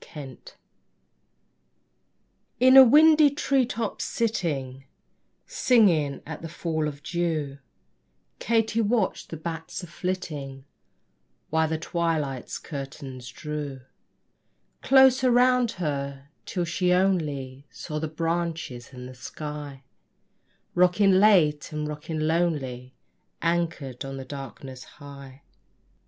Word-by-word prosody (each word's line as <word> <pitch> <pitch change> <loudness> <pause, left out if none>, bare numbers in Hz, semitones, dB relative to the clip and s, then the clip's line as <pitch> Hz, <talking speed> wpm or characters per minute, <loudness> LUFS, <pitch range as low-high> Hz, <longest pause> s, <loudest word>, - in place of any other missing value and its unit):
KATY 140 -4 -9
DID - - -15 2.1
In 260 +2 +6
a 265 - +12
windy 305 +3 +6
tree 275 -2 +1
top 230 -4 -4
sitting, 140 - -2 0.6
Singing 170 - +2
at 160 0 -7
the 165 - -7
fall 160 -1 -2
of 145 -1 -8
dew, 160 -5 -2 0.8
Katy 225 0 +1
watched 215 -2 0
the 165 - -6
bats 165 +3 -6
a - - -5
flitting, 155 -7 -5 0.9
While 160 0 +2
the 160 0 -2
twilight's 160 -6 -2
curtains 135 -3 -8
drew 145 0 -6 1.0
Closer 265 -1 +5
round 250 -1 +3
her; 140 -4 -4 0.2
till 180 -3 -2
she 180 +2 0
only 150 -8 0
Saw 150 -2 -6
the 160 - -2
branches 165 -6 -3
and 125 0 -9
the 130 - -10
sky 145 +1 -8 0.9
Rocking 180 +3 +4
late 170 -8 +4
and 150 0 -3
rocking 150 +1 -5
lonely, 150 -6 -1 0.5
Anchored 165 -7 -1
on 135 0 -6
the 135 - -7
darkness 135 -1 -9
high. 140 -2 -13
155 Hz, 110 wpm, -26 LUFS, 140-185 Hz, 2.1 s, a